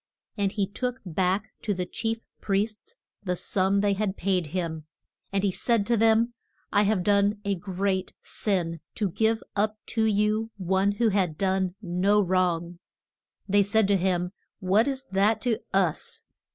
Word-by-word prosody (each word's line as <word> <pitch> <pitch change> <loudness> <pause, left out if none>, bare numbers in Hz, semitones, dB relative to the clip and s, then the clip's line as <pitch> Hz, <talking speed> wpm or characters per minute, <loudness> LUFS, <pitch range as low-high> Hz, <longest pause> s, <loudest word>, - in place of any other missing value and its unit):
And 200 -2 0
he 200 -3 +1
took 250 +6 -3
back 185 +4 0
to 205 -3 -1
the 180 0 -2
chief 225 +5 -3
priests 210 +2 -2 0.3
the 180 -2 -1
sum 195 +2 +1
they 200 -1 +2
had 200 0 -2
paid 185 -3 0
him, 160 -2 -3 0.5
and 195 0 0
he 200 - +2
said 230 +2 +1
to 235 - +2
them, 225 +1 +3 0.4
I 205 - +5
have 205 -3 +2
done 205 +1 +3
a 200 - +1
great 190 0 -2
sin 175 -5 -1 0.2
to 205 -4 -1
give 220 +4 +1
up 215 +1 +1 0.2
to 225 -2 +2
you 215 +1 +1
one 190 +2 +1
who 230 +2 +2
had 185 -6 0
done 190 -1 0
no 190 +3 +2
wrong. 175 -2 0 0.7
They 205 +1 +4
said 205 +1 +3
to 200 - +5
him, 180 -1 0 0.3
What 195 +6 +3
is 270 -1 -1
that 200 +3 +3
to 240 -4 +1
us? 185 -5 0
200 Hz, 165 wpm, -26 LUFS, 185-215 Hz, 0.7 s, I